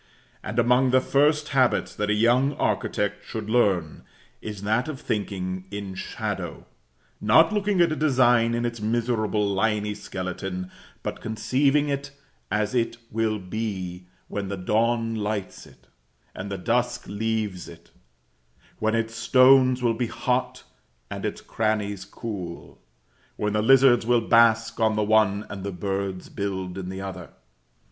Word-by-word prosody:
And 105 +2 -5
among 125 +2 +4
the 130 +1 +5
first 150 +3 +2
habits 130 -3 +2
that 105 0 -2
a 105 - +3
young 120 +6 +3
architect 105 -4 -1
should 110 -1 -6
learn, 95 -10 +1 0.4
is 105 -2 -7
that 110 +6 +1
of 150 -4 -5
thinking 95 -3 -3
in 100 -2 -6
shadow, 95 - -5 0.6
not 160 - +5
looking 205 -2 +1
at 170 -2 +4
a - - 0
design 120 -6 +3
in 120 0 -1
its 120 -2 -4
miserable 110 -2 0
liny 105 0 0
skeleton; 95 -2 -5 0.3
but - - -5
conceiving 135 +6 +1
it 140 0 -2 0.4
as 105 +2 0
it 115 -1 0
will 110 -1 0
be 95 -3 -5 0.2
when 100 -1 -4
the 100 0 -4
dawn 115 +4 +1
lights 105 -3 -4
it, - - -21 0.5
and 100 +2 -6
the 100 - -3
dusk 120 +4 -1
leaves 105 -3 -3
it; 85 0 -15 0.9
when 110 +1 +1
its 115 0 -1
stones 130 +2 +5
will 120 -1 +3
be 120 0 -2
hot 125 +2 -2 0.5
and - - -4
its - - -6
crannies 105 -3 -2
cool; 95 -7 -7 0.5
when 105 -1 -1
the 105 - +2
lizards 130 0 +6
will 120 -1 +4
bask 115 0 +4
on 110 -1 +2
the 105 - +1
one, 105 -1 +3
and 100 -2 -7
the 100 - -3
birds 95 0 -3
build 95 -2 -4
in 95 -1 -5
the 95 0 -5
other. 95 -2 -7
110 Hz, 150 wpm, -25 LUFS, 100-120 Hz, 0.9 s, lizards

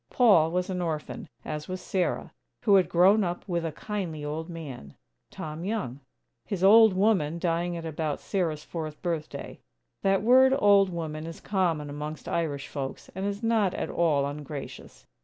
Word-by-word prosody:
Paul 200 -11 +5
was 180 +2 -1
an 180 -1 -2
orphan, 155 -3 -4 0.2
as 150 -1 -5
was 185 0 -4
Sarah, 180 0 -2 0.3
who 210 -4 +4
had 190 -2 +5
grown 195 +5 +5
up 175 +1 -4
with 170 -3 -1
a 165 - -2
kindly 165 -4 -5
old 160 +3 -4
man, 140 - -8 0.3
Tom 155 +1 -7
Young; 190 - -3 0.4
his 195 -4 -4
"old 220 +1 +8
woman," 185 -6 +2
dying 170 0 -1
at 165 - -6
about 155 -2 -2
Sarah's 165 -6 -2
fourth 155 -3 -6
birthday. 165 -3 -4 0.4
(That 195 0 +2
word 260 +3 +6
"old 200 -5 +5
woman," 160 -2 -5
is 165 - -8
common 175 -7 0
amongst 150 +1 -6
Irish 145 -5 -2
folks, 135 -2 -6
and 190 +2 -3
is 205 +2 -4
not 220 -5 +2
at - - -3
all 150 -5 +2
ungracious. 145 0 -7
170 Hz, 165 wpm, -27 LUFS, 155-195 Hz, 0.4 s, old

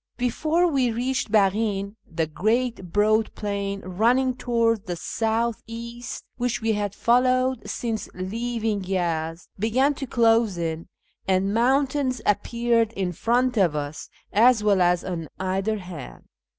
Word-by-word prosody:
Before 310 +8 +1
we 270 -8 +2
reached 245 0 -2
Baghin, 200 -1 +1 0.2
the 165 0 0
great 215 +3 -1
broad 215 +2 +2
plain 200 -1 -3
running 235 +8 +2
towards 230 -3 +1
the 175 - -2
south 225 +5 -1
east, 235 +1 -7
which 245 -2 -1
we 225 -1 +1
had 205 -1 -2
followed 255 +1 +2
since 225 -4 -3
leaving 220 +2 -2
Yezd, 170 -3 -2
began 255 +7 +2
to 270 -1 -6
close 225 -4 +3
in, 165 -1 -3 0.4
and 190 +1 +2
mountains 260 +2 +1
appeared 230 +2 +1
in 190 -3 -2
front 245 - +1
of 175 -7 +3
us, 145 +1 -5 0.2
as 225 +1 +5
well 200 -3 +3
as 175 0 +3
on 170 -4 -4
either 190 +3 -1
hand. 175 - -9
220 Hz, 135 wpm, -24 LUFS, 190-240 Hz, 0.4 s, as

